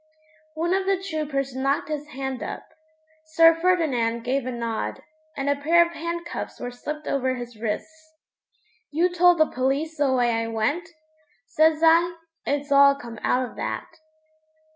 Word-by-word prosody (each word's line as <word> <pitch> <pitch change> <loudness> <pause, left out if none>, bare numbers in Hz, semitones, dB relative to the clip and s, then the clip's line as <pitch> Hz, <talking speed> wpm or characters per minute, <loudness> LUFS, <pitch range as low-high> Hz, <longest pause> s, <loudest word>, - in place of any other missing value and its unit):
One 340 +3 0
of 385 0 0
the 390 -2 +2
troopers 300 -7 -3
knocked 275 +2 0
his 300 -1 -4
hand 265 -2 -5
up. - - -5 0.6
Sir 330 +1 +5
Ferdinand 300 -10 +1
gave 255 +1 -1
a - - -2
nod, 225 - -4 0.3
and 275 - -2
a 285 - +3
pair 330 +4 +4
of 340 - -7
handcuffs 340 +1 -5
were 245 - -5
slipped 300 +5 -6
over 260 -2 0
his 240 -3 -9
wrists. 315 +8 -5 0.7
'You 335 +5 +2
told 355 0 +5
the 315 - +5
police 275 +5 -1
the 285 -2 +2
way 245 -2 +2
I 230 0 -1
went?' 255 +10 -1 0.6
says 315 +2 +2
I. 335 +2 +5 0.3
'It's 285 0 -2
all 280 0 +7
come 235 -5 -9
out 255 0 +1
of - - -14
that.' 325 - -5
285 Hz, 160 wpm, -24 LUFS, 255-325 Hz, 0.7 s, all